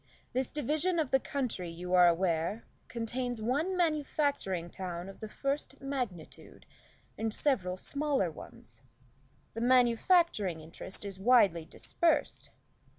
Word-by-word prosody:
This 260 0 0
division 305 +5 0
of 305 -5 0
the 265 - +5
county, 250 -11 -3
you 180 +2 -5
are 180 -1 +7
aware, 170 +4 +1 0.2
contains 245 +1 -3
one 290 - 0
manufacturing 285 - 0
town 180 -1 -5
of 195 - -11
the 220 - -7
first 275 +3 -3
magnitude, 250 - -6 0.5
and 220 0 -1
several 195 -9 0
smaller 280 - 0
ones. 115 -6 -12 0.7
The 225 - -4
manufacturing 245 - +3
interest 165 +5 -8
is 195 -2 -6
widely 195 -7 +4
dispersed. 330 - -1
230 Hz, 120 wpm, -31 LUFS, 180-280 Hz, 0.7 s, are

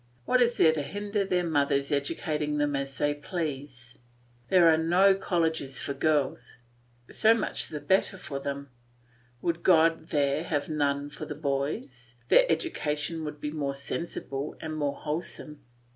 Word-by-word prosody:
What 255 - +3
is 240 0 +3
there 160 - +6
to 155 - -1
hinder 205 +6 -2
their 180 -2 0
mothers 140 -3 +1
educating 150 +1 -1
them 145 -1 +1
as 135 -1 -4
they 145 0 +1
please? 145 -6 -6 0.5
There 180 +1 +5
are 160 - +7
no 175 +5 +4
colleges 160 -8 -1
for 140 - -3
girls; 145 0 0 0.5
so 220 +1 +5
much 230 - -2
the 150 - -5
better 190 +3 +1
for 145 -6 -5
them! 140 0 -5 0.7
Would 170 0 -1
God 165 -2 +4
there 145 +2 0
were 150 +1 -1
none 145 -1 0
for - - -7
the 150 - -5
boys, 135 -4 -3
their - - +6
education 155 0 -2
would 150 0 -6
be 150 - -4
more 140 -3 -2
sensible 140 -1 -5
and 155 -1 -5
more 145 -2 -1
wholesome. 150 -1 -4
150 Hz, 155 wpm, -28 LUFS, 140-165 Hz, 0.7 s, are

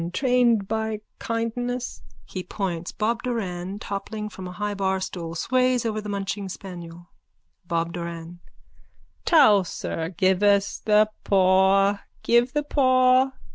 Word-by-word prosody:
Trained 245 -5 +2
by 220 0 -2 0.2
kindness. 245 +2 -3 0.2
(He 185 - -6
points. 180 -3 -4
Bob 230 +2 -1
Doran, 195 -6 -3
toppling 210 +1 -5
from 190 -3 -8
a - - -7
high 210 +2 -3
barstool, 190 -4 -2
sways 255 +3 +1
over 215 -1 -1
the 210 - -7
munching 200 0 -3
spaniel.) 175 -2 -9 0.6
BOB 170 0 -1
DORAN: 170 0 -6 0.9
Towser. 205 - +3
Give 190 +1 +1
us 200 -1 +3
the 215 0 +3
paw. 195 +1 +4 0.2
Give 240 +1 +3
the 295 0 0
paw. 255 -2 +3
205 Hz, 120 wpm, -24 LUFS, 185-235 Hz, 0.9 s, paw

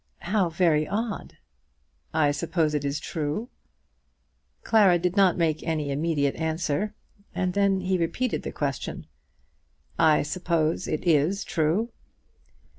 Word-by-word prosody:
"How 185 -1 +1
very 160 -3 +2
odd." 215 0 -4 0.7
"I 155 -2 +3
suppose 155 +1 0
it 150 -1 -1
is 140 +1 -1
true?" 155 +10 -3 1.1
Clara 200 -5 +5
did 180 +2 -1
not 195 -3 +4
make 160 -3 +1
any 155 -3 -2
immediate 145 -1 0
answer, 160 +5 -1 0.4
and 185 -1 0
then 200 -1 +2
he 185 0 0
repeated 225 +9 -1
the - - -5
question. - - -4 0.9
"I 160 -2 +5
suppose 170 +1 -1
it 155 - -2
is 165 +5 +3
true?" 170 +9 0
165 Hz, 120 wpm, -26 LUFS, 155-190 Hz, 1.1 s, Clara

